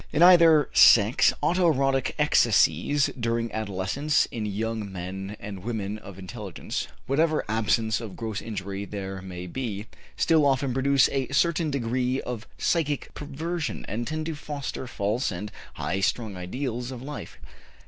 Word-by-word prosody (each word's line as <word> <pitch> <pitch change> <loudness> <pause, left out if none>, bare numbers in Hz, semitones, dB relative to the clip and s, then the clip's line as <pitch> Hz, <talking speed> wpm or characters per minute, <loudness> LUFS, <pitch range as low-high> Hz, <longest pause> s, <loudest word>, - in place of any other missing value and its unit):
In 155 +3 +3
either 165 -5 +7
sex 110 +1 +6
auto 175 +3 +3
erotic 135 -3 +1
excesses 130 - +3
during 115 0 -1
adolescence 110 +8 0
in 110 -3 -3
young 110 0 -3
men 95 +3 -6
and 100 -3 -7
women 110 -2 -3
of 100 -3 -11
intelligence 95 -1 -5 0.2
whatever 155 +3 +1
absence 110 +1 +1
of 110 -5 -7
gross 110 -3 -4
injury 100 -2 -5
there 95 -2 -6
may 90 -1 -7
be 105 0 -4 0.3
still 160 -2 +4
often 135 -2 +2
produce 135 +1 +4
a 135 -2 -1
certain 160 +3 +1
degree 130 -1 0
of 120 -3 -6
psychic 150 -4 0
perversion, 160 +3 -4
and 115 +4 -3
tend 155 0 -3
to 165 - -2
foster 145 -3 -5
false 110 +2 -1
and 100 +3 -5 0.2
high 95 - -2
strung 105 +1 -1
ideals 120 +6 -4
of 130 -2 -7
life. 145 +1 -7
120 Hz, 145 wpm, -26 LUFS, 100-140 Hz, 0.3 s, either